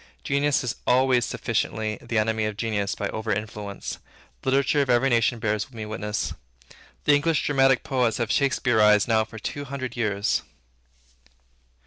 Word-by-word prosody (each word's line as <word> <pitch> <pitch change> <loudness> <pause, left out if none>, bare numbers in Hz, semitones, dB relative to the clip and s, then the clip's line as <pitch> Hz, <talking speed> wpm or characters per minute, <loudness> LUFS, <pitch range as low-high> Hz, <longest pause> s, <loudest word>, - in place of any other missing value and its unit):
Genius 140 - +1
is 125 - -3
always 125 -1 +4
sufficiently 110 -1 -2
the 115 -1 -3
enemy 110 0 +1
of 105 -1 -4
genius 105 -3 -1
by 105 - -2
over 110 0 -3
influence. 105 -1 -4 0.4
The - - -1
literature 140 +1 +2
of 135 - -1
every 125 +2 +3
nation 120 0 +2
bear 110 -2 0 0.2
me 110 -3 -6
witness. 105 -5 -3 0.7
The 150 - +4
English 150 +2 +2
dramatic 135 -2 +3
poets 125 -4 0
have 115 -2 -1
Shakspearized 110 -6 +3
now 110 -1 +3
for 110 0 -11
two 145 +6 -5
hundred 130 -3 -5
years. 105 -3 0
115 Hz, 150 wpm, -25 LUFS, 105-130 Hz, 0.7 s, always